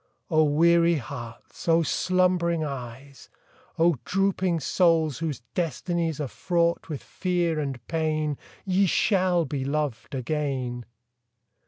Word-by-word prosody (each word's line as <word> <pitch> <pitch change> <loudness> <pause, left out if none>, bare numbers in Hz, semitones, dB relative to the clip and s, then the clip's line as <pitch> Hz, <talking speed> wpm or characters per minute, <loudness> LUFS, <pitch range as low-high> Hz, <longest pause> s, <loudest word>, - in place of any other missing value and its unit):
O 155 -1 +5
weary 170 +3 +4
hearts! 120 -2 -8
O 165 0 +4
slumbering 180 -2 +1
eyes! 135 -1 -7 0.5
O 165 -2 +3
drooping 190 -3 +1
souls, 160 -3 +2
whose 155 -7 -3
destinies 165 0 -1
Are 145 - -2
fraught 170 +4 0
with 150 -4 -5
fear 175 -3 -1
and 135 -4 -3
pain, 155 -2 -1 0.3
Ye 195 0 +3
shall 180 -2 +2
be 135 -1 -3
loved 140 -4 -2
again! 130 -4 -2
160 Hz, 115 wpm, -26 LUFS, 140-170 Hz, 0.5 s, O